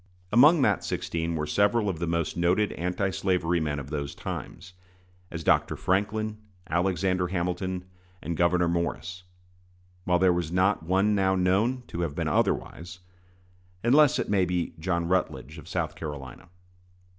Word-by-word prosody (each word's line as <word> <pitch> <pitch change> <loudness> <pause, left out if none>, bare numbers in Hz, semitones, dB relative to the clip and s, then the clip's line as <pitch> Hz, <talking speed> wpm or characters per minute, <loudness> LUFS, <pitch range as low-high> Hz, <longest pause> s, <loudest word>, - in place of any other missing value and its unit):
Among 145 +6 +6
that 105 -6 +2
sixteen 85 0 -2
were 75 -1 -1
several 100 +7 +2
of 90 -5 -2
the 85 - -2
most 85 -1 -1
noted 90 +4 +2
anti 90 +3 -1
slavery 90 -3 0
men 75 -2 -2
of 70 0 -7
those 70 -2 -4
times, 90 - -7 0.6
as 80 -1 -6
Dr. - - +2
Franklin, 105 +3 -1 0.3
Alexander 90 +2 0
Hamilton, 90 +1 -2 0.3
and 85 - -4
Gouverneur 90 +1 +2
Morris, 85 +1 -3 0.8
while 90 -1 +3
there 90 0 +4
was 85 -2 -2
not 95 +2 +2
one 95 +5 +2
now 95 -1 +2
known 100 +8 +1
to 85 - -4
have 80 -4 -2
been - - -2
otherwise, 90 +2 -1 0.8
unless 140 +4 +5
it - - -2
may 100 -2 +2
be 90 -1 -1
John 85 0 -1
Rutledge, 85 -4 -2
of 80 +2 -13
South 85 -4 -2
Carolina. 75 -2 -8
90 Hz, 150 wpm, -27 LUFS, 85-95 Hz, 0.8 s, Among